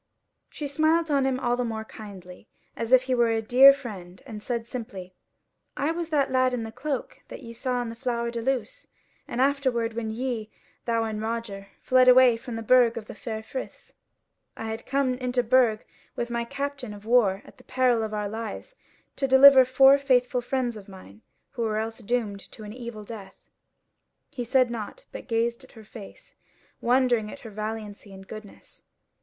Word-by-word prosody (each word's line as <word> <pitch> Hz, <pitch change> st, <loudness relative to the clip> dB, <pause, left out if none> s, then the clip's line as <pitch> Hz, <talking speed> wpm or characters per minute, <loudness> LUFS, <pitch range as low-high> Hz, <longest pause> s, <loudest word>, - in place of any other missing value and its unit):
She 300 Hz, -, -7 dB
smiled 315 Hz, +3 st, +1 dB
on 275 Hz, -2 st, +2 dB
him 260 Hz, -1 st, 0 dB
still 245 Hz, -1 st, 0 dB
more 220 Hz, -2 st, -4 dB
kindly, 195 Hz, -3 st, -12 dB, 0.3 s
as 230 Hz, +1 st, -4 dB
if 255 Hz, -1 st, +6 dB
he 260 Hz, 0 st, -1 dB
were 240 Hz, -2 st, +3 dB
a 225 Hz, 0 st, +1 dB
dear 250 Hz, +5 st, +8 dB
friend, 195 Hz, -10 st, -8 dB
and 210 Hz, -1 st, -8 dB
said 235 Hz, 0 st, -3 dB
simply: 195 Hz, -7 st, -7 dB, 0.6 s
"I 290 Hz, +3 st, 0 dB
was 335 Hz, 0 st, -4 dB
that 285 Hz, -4 st, +1 dB
lad 255 Hz, -1 st, +2 dB
in 235 Hz, -, -3 dB
the 225 Hz, -, -6 dB
cloak 275 Hz, +2 st, -5 dB
that -, -, -10 dB
ye 230 Hz, -1 st, -9 dB
saw 250 Hz, +1 st, -2 dB
in 235 Hz, -, -5 dB
the 230 Hz, -, -7 dB
Flower 235 Hz, -1 st, -2 dB
de 235 Hz, -1 st, -4 dB
Luce; 270 Hz, -, -3 dB, 0.4 s
and 240 Hz, -, -5 dB
afterwards 260 Hz, -4 st, +1 dB
when 225 Hz, -1 st, -3 dB
ye, 225 Hz, -1 st, -3 dB, 0.4 s
thou 230 Hz, -1 st, +1 dB
and 215 Hz, -1 st, -4 dB
Roger, 220 Hz, -3 st, -4 dB, 0.2 s
fled 255 Hz, 0 st, +4 dB
away 250 Hz, -1 st, +7 dB
from 230 Hz, +1 st, -7 dB
the 225 Hz, -, -5 dB
Burg 240 Hz, 0 st, +4 dB
of 220 Hz, -, -6 dB
the -, -, -9 dB
Four 220 Hz, 0 st, -6 dB
Friths. 260 Hz, +4 st, -8 dB, 0.6 s
I -, -, -6 dB
had 220 Hz, 0 st, -6 dB
come 275 Hz, -1 st, +1 dB
into 250 Hz, -1 st, 0 dB
the -, -, -16 dB
Burg 245 Hz, -4 st, +3 dB, 0.3 s
with 240 Hz, 0 st, -3 dB
my 235 Hz, 0 st, -2 dB
captain 275 Hz, -4 st, -5 dB
of 205 Hz, +1 st, -14 dB
war 215 Hz, -5 st, +3 dB
at -, -, -17 dB
the -, -, -17 dB
peril 250 Hz, -3 st, +1 dB
of 220 Hz, -1 st, -3 dB
our 210 Hz, -1 st, -2 dB
lives 225 Hz, -, -6 dB, 0.4 s
to 270 Hz, -, 0 dB
deliver 265 Hz, 0 st, +8 dB
four 270 Hz, +2 st, +6 dB
faithful 250 Hz, -2 st, +2 dB
friends 245 Hz, -1 st, -2 dB
of 205 Hz, -2 st, -11 dB
mine 110 Hz, -, -14 dB, 0.3 s
who 235 Hz, -, -6 dB
were 220 Hz, -2 st, 0 dB
else 225 Hz, +1 st, -3 dB
doomed 225 Hz, -3 st, -2 dB
to 220 Hz, -, -11 dB
an 210 Hz, 0 st, -8 dB
evil 235 Hz, -3 st, -8 dB
death." 205 Hz, -3 st, -11 dB, 0.8 s
He 250 Hz, -4 st, -5 dB
said 255 Hz, 0 st, +2 dB
nought, 235 Hz, -, -7 dB
but -, -, -9 dB
gazed 235 Hz, +1 st, -1 dB
at 260 Hz, -, -18 dB
her 220 Hz, -2 st, -14 dB
face, 210 Hz, -2 st, -13 dB, 0.4 s
wondering 245 Hz, -3 st, +2 dB
at 280 Hz, -, -11 dB
her 225 Hz, -, -10 dB
valiancy 215 Hz, -1 st, -6 dB
and 195 Hz, 0 st, -12 dB
goodness. 215 Hz, -1 st, -12 dB
235 Hz, 195 wpm, -26 LUFS, 220-255 Hz, 0.8 s, dear